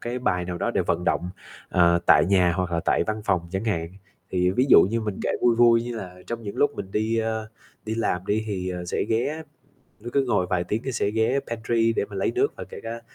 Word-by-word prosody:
cái 120 Hz, +1 st, -4 dB
bài 90 Hz, -8 st, 0 dB
nào 90 Hz, 0 st, -5 dB
đó -, -, 0 dB
để -, -, 0 dB
vận 85 Hz, +1 st, -1 dB
động, 90 Hz, 0 st, 0 dB, 0.4 s
ờ, 85 Hz, -1 st, +4 dB
tại -, -, +6 dB
nhà 90 Hz, -2 st, +3 dB
hoặc 90 Hz, -2 st, -2 dB
là 85 Hz, -, +1 dB
tại -, -, +1 dB
văn 110 Hz, 0 st, -3 dB
phòng 95 Hz, -4 st, +2 dB
chẳng 95 Hz, +4 st, -3 dB
hạn. 85 Hz, -7 st, -1 dB, 0.4 s
Thì 90 Hz, -1 st, +2 dB
ví 125 Hz, +8 st, +2 dB
dụ -, -, +9 dB
như 115 Hz, +5 st, 0 dB
mình 105 Hz, -3 st, -4 dB
kể -, -, 0 dB
vui 120 Hz, -1 st, +4 dB
vui 115 Hz, -1 st, +5 dB
như 120 Hz, -1 st, -5 dB
là 90 Hz, -4 st, -7 dB
trong 115 Hz, 0 st, -5 dB
những 100 Hz, -2 st, -6 dB
lúc 145 Hz, -, +3 dB
mình 95 Hz, -, -6 dB
đi, 110 Hz, +3 st, 0 dB
ơ, 110 Hz, -1 st, -2 dB, 0.4 s
đi 110 Hz, -, -2 dB
làm 95 Hz, -5 st, -1 dB
đi 110 Hz, +2 st, 0 dB
thì 95 Hz, -3 st, -3 dB
sẽ -, -, -1 dB
ghé 140 Hz, +8 st, -1 dB, 0.6 s
cứ 120 Hz, -, -5 dB
cứ 140 Hz, -1 st, +2 dB
ngồi 105 Hz, -7 st, +1 dB
vài 90 Hz, -1 st, +1 dB
tiếng 105 Hz, +5 st, -2 dB
nó 135 Hz, -, -1 dB
sẽ 110 Hz, -4 st, 0 dB
ghé 110 Hz, +5 st, +1 dB
pantry 115 Hz, 0 st, +1 dB
để 100 Hz, -, 0 dB
mình 100 Hz, -2 st, -8 dB
lấy 95 Hz, -, 0 dB
nước -, -, +1 dB
và -, -, -7 dB
kể -, -, -10 dB
cả, 115 Hz, +1 st, -6 dB
110 Hz, 250 wpm, -24 LUFS, 90-115 Hz, 0.6 s, dụ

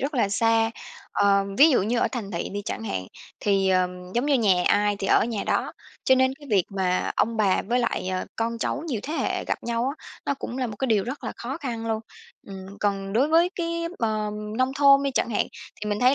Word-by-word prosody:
rất 280 Hz, +3 st, -2 dB
là 235 Hz, -6 st, +2 dB
xa. 225 Hz, +2 st, +2 dB, 0.4 s
Ờ, 200 Hz, -1 st, +3 dB
ví 310 Hz, +3 st, +8 dB
dụ 255 Hz, -, +3 dB
như 230 Hz, +4 st, 0 dB
ở -, -, +2 dB
thành 220 Hz, -6 st, -4 dB
thị 170 Hz, -, -3 dB
đi 205 Hz, +1 st, -5 dB
chẳng -, -, -4 dB
hạn 95 Hz, -, -3 dB, 0.3 s
thì, 195 Hz, -2 st, +2 dB
ừm, 180 Hz, 0 st, -1 dB
giống 240 Hz, +4 st, +1 dB
như 290 Hz, -, +3 dB
nhà 195 Hz, -8 st, +3 dB
ai 205 Hz, 0 st, +3 dB
thì 195 Hz, -, -3 dB
ở -, -, +4 dB
nhà 225 Hz, -3 st, -3 dB
đó, -, -, 0 dB, 0.3 s
cho 260 Hz, -, +6 dB
nên 260 Hz, 0 st, +2 dB
cái 290 Hz, +1 st, -15 dB
việc 195 Hz, -4 st, +3 dB
mà 185 Hz, -2 st, 0 dB
ông 230 Hz, +2 st, +1 dB
bà 205 Hz, -3 st, +2 dB
với 240 Hz, +4 st, 0 dB
lại, 235 Hz, -6 st, -1 dB
ờ, 185 Hz, 0 st, -2 dB
con 230 Hz, +1 st, -2 dB
cháu 235 Hz, -, -2 dB
nhiều 250 Hz, -10 st, -2 dB
thế 300 Hz, -, -5 dB
hệ -, -, -1 dB
gặp -, -, -1 dB
nhau 235 Hz, +1 st, -1 dB
á, -, -, -18 dB, 0.2 s
nó 280 Hz, -, +1 dB
cũng 265 Hz, -2 st, -6 dB
là 255 Hz, -, 0 dB
một 220 Hz, -, -6 dB
điều 215 Hz, -4 st, +2 dB
rất 260 Hz, +4 st, -6 dB
là -, -, -3 dB
khó 260 Hz, +5 st, -5 dB
khăn 235 Hz, -6 st, -4 dB
luôn. 220 Hz, -1 st, -1 dB, 0.5 s
Ừm, 195 Hz, 0 st, -9 dB
còn 195 Hz, -1 st, -1 dB
đối 260 Hz, +7 st, +3 dB
với 335 Hz, +3 st, +4 dB
cái, 335 Hz, -1 st, -2 dB
ờ, 215 Hz, -2 st, -1 dB, 0.3 s
nông 255 Hz, +1 st, +2 dB
thôn 275 Hz, 0 st, +6 dB
đi 280 Hz, -, 0 dB
chẳng 255 Hz, -, 0 dB
hạn 210 Hz, -, +1 dB, 0.3 s
thì 210 Hz, -, -3 dB
mình 205 Hz, -, -1 dB
thấy 255 Hz, +2 st, +5 dB
225 Hz, 240 wpm, -25 LUFS, 200-260 Hz, 0.5 s, ví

